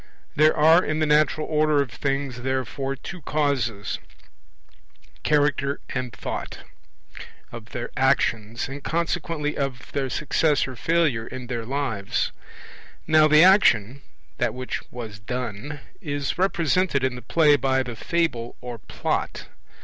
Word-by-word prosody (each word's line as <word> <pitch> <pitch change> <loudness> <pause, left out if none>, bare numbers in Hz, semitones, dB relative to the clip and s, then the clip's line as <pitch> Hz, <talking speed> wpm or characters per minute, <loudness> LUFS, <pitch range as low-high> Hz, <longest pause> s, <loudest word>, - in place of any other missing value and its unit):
There 155 +2 +4
are 160 +4 +6
in 155 - -1
the 155 - +2
natural 155 0 +3
order 155 -1 +2
of 140 -4 0
things, 135 -1 -2
therefore, 130 +1 -2
two 180 +6 -9
causes, 130 -8 -1 1.2
Character 145 -1 +1
and 125 -2 -3
Thought, 100 - -6 0.9
of - - -8
their - - -5
actions, 115 +1 +1
and 140 +1 -8
consequently 165 -2 -1
of 135 -3 -4
their 135 -2 -1
success 150 +1 +1
or 130 - -7
failure 150 -6 +1
in 130 -1 -7
their 120 -2 -4
lives. 130 -8 -1 0.7
Now 155 -1 +5
the 155 +1 +7
action 140 - +5 0.4
(that 120 -2 0
which 130 0 -4
was 110 -4 -7
done) 125 +4 -5 0.2
is 145 -5 -2
represented 180 -4 +1
in 130 -1 +1
the 125 - -8
play 150 +5 +4
by 130 -1 +1
the 120 -2 -6
Fable 125 -5 -1
or 120 -2 -7
Plot. - - -3
140 Hz, 135 wpm, -24 LUFS, 125-155 Hz, 1.2 s, the